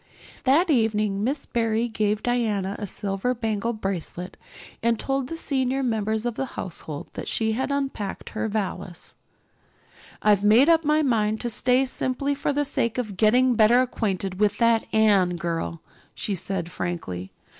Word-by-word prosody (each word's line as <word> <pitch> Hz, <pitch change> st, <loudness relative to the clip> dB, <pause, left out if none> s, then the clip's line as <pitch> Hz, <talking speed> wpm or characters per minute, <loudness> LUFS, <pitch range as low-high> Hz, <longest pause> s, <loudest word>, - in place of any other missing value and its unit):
That 315 Hz, +7 st, +4 dB
evening 215 Hz, -5 st, +1 dB
Miss 275 Hz, +5 st, -1 dB
Barry 225 Hz, 0 st, 0 dB
gave 215 Hz, -2 st, -1 dB
Diana 215 Hz, -5 st, 0 dB
a 205 Hz, -, -4 dB
silver 195 Hz, +6 st, -2 dB
bangle 225 Hz, -1 st, -1 dB
bracelet 190 Hz, -4 st, -4 dB, 0.5 s
and 230 Hz, 0 st, +2 dB
told 270 Hz, -1 st, -1 dB
the 330 Hz, -, -5 dB
senior 270 Hz, -3 st, 0 dB
members 220 Hz, -2 st, -1 dB
of 240 Hz, -, 0 dB
the 265 Hz, -, -2 dB
household 155 Hz, -4 st, -6 dB
that -, -, -6 dB
she 220 Hz, -1 st, 0 dB
had 255 Hz, +5 st, -1 dB
unpacked 270 Hz, -8 st, -3 dB
her 225 Hz, -, -2 dB
valise. 190 Hz, -4 st, -4 dB, 1.1 s
"I've 205 Hz, -2 st, +4 dB
made 230 Hz, +9 st, +6 dB
up 330 Hz, -1 st, +5 dB
my 305 Hz, +1 st, +3 dB
mind 220 Hz, -5 st, +1 dB
to 240 Hz, -, -1 dB
stay 250 Hz, +3 st, +3 dB
simply 260 Hz, +2 st, -1 dB
for 285 Hz, +1 st, -1 dB
the 290 Hz, +1 st, 0 dB
sake 235 Hz, -4 st, -1 dB
of 215 Hz, -6 st, -3 dB
getting 245 Hz, +6 st, +4 dB
better 230 Hz, +2 st, +5 dB
acquainted 195 Hz, -6 st, -1 dB
with 210 Hz, -1 st, +2 dB
that 230 Hz, -1 st, +3 dB
Anne 200 Hz, -5 st, +4 dB
girl," 170 Hz, -1 st, -3 dB, 0.3 s
she 205 Hz, -, -2 dB
said 180 Hz, -1 st, -3 dB
frankly. 95 Hz, -, -4 dB
220 Hz, 155 wpm, -25 LUFS, 200-255 Hz, 1.1 s, made